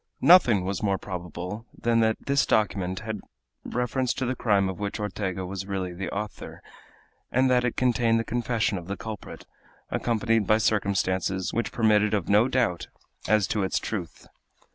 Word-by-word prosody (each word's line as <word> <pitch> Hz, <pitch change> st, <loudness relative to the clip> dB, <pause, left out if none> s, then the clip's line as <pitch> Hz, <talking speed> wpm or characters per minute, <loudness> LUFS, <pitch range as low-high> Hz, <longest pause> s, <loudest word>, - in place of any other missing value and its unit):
Nothing 120 Hz, -, +6 dB
was 95 Hz, 0 st, -2 dB
more 100 Hz, -2 st, +1 dB
probable 90 Hz, +4 st, -6 dB
than 115 Hz, 0 st, +1 dB
that 110 Hz, -1 st, +2 dB
this 140 Hz, 0 st, +2 dB
document 95 Hz, -3 st, 0 dB
had 110 Hz, -2 st, -4 dB, 0.4 s
reference 125 Hz, +1 st, -1 dB
to 130 Hz, -, -2 dB
the 130 Hz, +1 st, -1 dB
crime 100 Hz, -5 st, +2 dB
of 95 Hz, +1 st, -5 dB
which 100 Hz, +1 st, -3 dB
Ortega 95 Hz, -2 st, -3 dB
was 95 Hz, +1 st, -5 dB
really 95 Hz, -2 st, -3 dB
the 90 Hz, 0 st, -4 dB
author, 105 Hz, +1 st, -6 dB, 0.7 s
and 130 Hz, +1 st, +3 dB
that 125 Hz, -1 st, +3 dB
it 125 Hz, -, -1 dB
contained 120 Hz, -2 st, +2 dB
the -, -, -1 dB
confession 115 Hz, -4 st, -1 dB
of 85 Hz, -, -12 dB
the 100 Hz, -, -4 dB
culprit, 110 Hz, -3 st, -8 dB, 0.5 s
accompanied 115 Hz, -3 st, +1 dB
by 110 Hz, -, +5 dB
circumstances 95 Hz, -3 st, 0 dB
which 115 Hz, -, -1 dB
permitted 105 Hz, -2 st, +3 dB
of 100 Hz, -5 st, -2 dB
no 105 Hz, +4 st, +5 dB
doubt 120 Hz, -9 st, 0 dB, 0.4 s
as 105 Hz, -1 st, +3 dB
to 105 Hz, -, 0 dB
its 95 Hz, -, 0 dB
truth. 100 Hz, -6 st, -5 dB
105 Hz, 165 wpm, -26 LUFS, 95-115 Hz, 0.7 s, Nothing